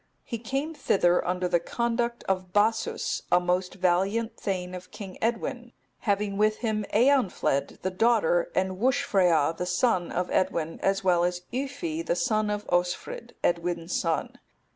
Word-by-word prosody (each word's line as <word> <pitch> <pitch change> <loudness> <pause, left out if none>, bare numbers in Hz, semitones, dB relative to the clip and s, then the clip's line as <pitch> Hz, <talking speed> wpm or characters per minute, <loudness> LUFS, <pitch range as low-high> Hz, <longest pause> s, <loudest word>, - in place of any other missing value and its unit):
He 230 - -5
came 270 +7 -3
thither 180 - +2
under 180 0 0
the 175 -1 +2
conduct 235 +5 -1
of 185 -1 -2
Bassus, 215 +3 +1
a 175 - +6
most 180 +1 -1
valiant 195 +5 +1
thegn 185 -2 -3
of 180 0 -9
King 195 -3 -9
Edwin, 240 +1 -2 0.3
having 200 -1 0
with 215 +1 +3
him 215 -2 -1
Eanfled, 215 - +2
the 185 - 0
daughter, 485 - +2
and 185 0 0
Wuscfrea, 180 - +2
the 180 +2 -3
son 180 -1 +1
of 180 0 -2
Edwin, 170 -4 0
as 195 0 +1
well 175 -2 +3
as 180 0 -1
Yffi, 245 - -3
the 170 - 0
son 215 +4 +1
of 210 0 -2
Osfrid, 180 - -1
Edwin's 175 0 -1
son. 165 -2 -1
190 Hz, 150 wpm, -27 LUFS, 180-230 Hz, 0.3 s, a